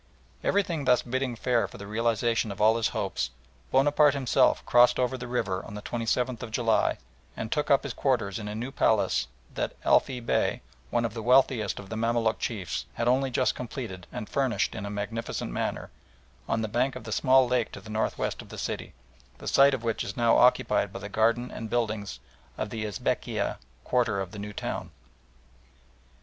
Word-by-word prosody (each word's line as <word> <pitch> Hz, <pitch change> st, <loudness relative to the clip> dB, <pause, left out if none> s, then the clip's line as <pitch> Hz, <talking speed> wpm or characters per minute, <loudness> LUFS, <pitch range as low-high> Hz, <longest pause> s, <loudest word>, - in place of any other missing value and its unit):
Everything 170 Hz, -7 st, +1 dB
thus 125 Hz, -1 st, +4 dB
bidding 130 Hz, 0 st, -2 dB
fair 120 Hz, 0 st, +1 dB
for -, -, -12 dB
the 100 Hz, -, -8 dB
realisation 115 Hz, +1 st, 0 dB
of 100 Hz, -, -8 dB
all 110 Hz, +2 st, +5 dB
his 115 Hz, -, +2 dB
hopes, 65 Hz, -, -2 dB, 0.4 s
Bonaparte 145 Hz, +2 st, +4 dB
himself 135 Hz, -3 st, +2 dB
crossed 120 Hz, 0 st, +5 dB
over 130 Hz, +1 st, +1 dB
the 125 Hz, -1 st, -6 dB
river 100 Hz, -6 st, -1 dB
on 105 Hz, -, -9 dB
the 105 Hz, -, -6 dB
27th 120 Hz, +1 st, -1 dB
of 120 Hz, -, -5 dB
July 115 Hz, -1 st, +2 dB, 0.4 s
and 110 Hz, 0 st, -4 dB
took 150 Hz, -1 st, 0 dB
up 140 Hz, -, +4 dB
his 140 Hz, -4 st, -4 dB
quarters 115 Hz, -8 st, 0 dB
in 105 Hz, -, -6 dB
a 105 Hz, -, -4 dB
new 120 Hz, +4 st, -4 dB
palace 110 Hz, -, +2 dB, 0.3 s
that -, -, -3 dB
Elfy 130 Hz, -2 st, +3 dB
Bey, 115 Hz, -, 0 dB, 0.3 s
one 120 Hz, 0 st, +1 dB
of 115 Hz, -, -3 dB
the 115 Hz, -, -5 dB
wealthiest 125 Hz, -3 st, +3 dB
of 100 Hz, -1 st, -9 dB
the 110 Hz, -, -4 dB
Mamaluk 115 Hz, 0 st, +1 dB
chiefs, 100 Hz, -7 st, -3 dB
had 115 Hz, -, -1 dB
only 130 Hz, +2 st, +3 dB
just 130 Hz, 0 st, +2 dB
had -, -, -14 dB
completed 115 Hz, -8 st, -6 dB
and 105 Hz, -, -5 dB
furnished 135 Hz, -3 st, 0 dB
in 100 Hz, -3 st, -5 dB
a -, -, -4 dB
magnificent 105 Hz, -, -4 dB
manner, -, -, -3 dB, 0.6 s
on 110 Hz, 0 st, +1 dB
the -, -, -1 dB
bank 125 Hz, +5 st, 0 dB
of -, -, -7 dB
the 110 Hz, -, -7 dB
small 130 Hz, +3 st, +4 dB
lake 125 Hz, -2 st, 0 dB
to -, -, -8 dB
the 105 Hz, +2 st, -11 dB
north 110 Hz, +1 st, -1 dB
west -, -, -2 dB
of -, -, -14 dB
the -, -, -9 dB
city, -, -, -4 dB, 0.4 s
the -, -, -9 dB
site 140 Hz, 0 st, +5 dB
of 120 Hz, -, -8 dB
which 115 Hz, -2 st, -1 dB
is 100 Hz, -, -6 dB
now 115 Hz, -1 st, +4 dB
occupied 125 Hz, -5 st, +3 dB
by -, -, -6 dB
the 100 Hz, +1 st, -7 dB
garden 115 Hz, +4 st, +1 dB
and 110 Hz, -, -6 dB
buildings 110 Hz, -, -2 dB, 0.4 s
of 105 Hz, -1 st, -3 dB
the 110 Hz, -2 st, -3 dB
Esbekieh 100 Hz, -, -1 dB, 0.3 s
quarter 115 Hz, -5 st, +1 dB
of 95 Hz, -2 st, -4 dB
the 105 Hz, -, -8 dB
new 105 Hz, +1 st, -5 dB
town. -, -, -4 dB
115 Hz, 200 wpm, -28 LUFS, 105-125 Hz, 0.6 s, all